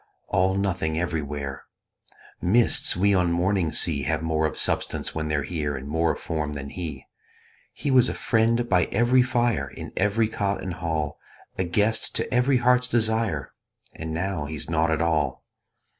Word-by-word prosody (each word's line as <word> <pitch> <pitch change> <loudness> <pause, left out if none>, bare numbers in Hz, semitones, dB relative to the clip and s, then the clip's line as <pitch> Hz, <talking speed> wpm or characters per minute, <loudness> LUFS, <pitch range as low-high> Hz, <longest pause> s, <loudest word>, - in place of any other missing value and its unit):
All 95 +1 +2
nothing 95 -5 -1
everywhere: 75 -5 -3 0.8
Mists 110 0 +3
we 100 +2 +3
on 90 -2 +2
mornings 90 -1 +1
see 75 -5 0
Have 70 - -1
more 80 -1 +1
of - - -7
substance - - -1
when 80 0 -2
they're 75 -2 0
here 75 -1 -2
And 65 +1 -8
more 80 +3 +1
of - - -9
form 75 -2 -3
than 70 -1 -6
he. 80 -7 -6 0.7
He 140 - -3
was 130 -2 +5
a - - -3
friend 115 +1 +1
by 90 -5 +3
every 120 +4 +3
fire, 120 - +1
In - - -9
every 105 +3 +2
cot 100 -2 -2
and 95 -2 -3
hall 80 -4 -3 0.4
A 95 - +1
guest 105 +5 0
to - - -2
every 125 +2 +3
heart's 125 +1 +3
desire, 110 - 0 0.4
And 80 0 -6
now 85 -1 -2
he's 75 +1 -5
nought 80 0 +2
at 80 +1 +1
all. 75 -6 0
85 Hz, 170 wpm, -25 LUFS, 80-110 Hz, 0.8 s, was